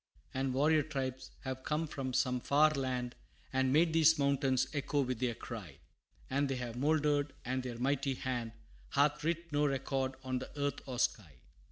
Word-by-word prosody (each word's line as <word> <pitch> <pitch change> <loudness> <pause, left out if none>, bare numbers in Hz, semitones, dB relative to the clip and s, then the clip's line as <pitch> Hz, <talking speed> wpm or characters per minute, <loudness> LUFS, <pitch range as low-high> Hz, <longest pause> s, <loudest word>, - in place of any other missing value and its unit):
And 130 -1 -1
warrior 155 +3 +4
tribes 130 -3 -4
have 130 -1 -4
come 150 +4 -1
from 135 -4 -4
some 125 0 +1
far 150 +5 +4
land, 130 -3 -2 0.4
And 130 0 +2
made 160 +3 +4
these 160 -1 +6
mountains 140 -2 +2
echo 145 0 0
with 130 -3 -2
their 120 -2 0
cry 105 - -7 0.5
And 140 +1 +1
they 135 - 0
have 125 -2 -4
mouldered 145 +1 +2
and 130 +1 -1
their 125 -2 -5
mighty 135 +2 0
hand 120 -3 -3 0.4
Hath 145 +1 +3
writ 170 +1 -1
no 145 0 +3
record 135 -1 -1
on 130 -1 -1
the 130 - -7
earth 145 0 -1
or 125 -2 -4
sky! 100 - 0
135 Hz, 175 wpm, -34 LUFS, 130-145 Hz, 0.5 s, these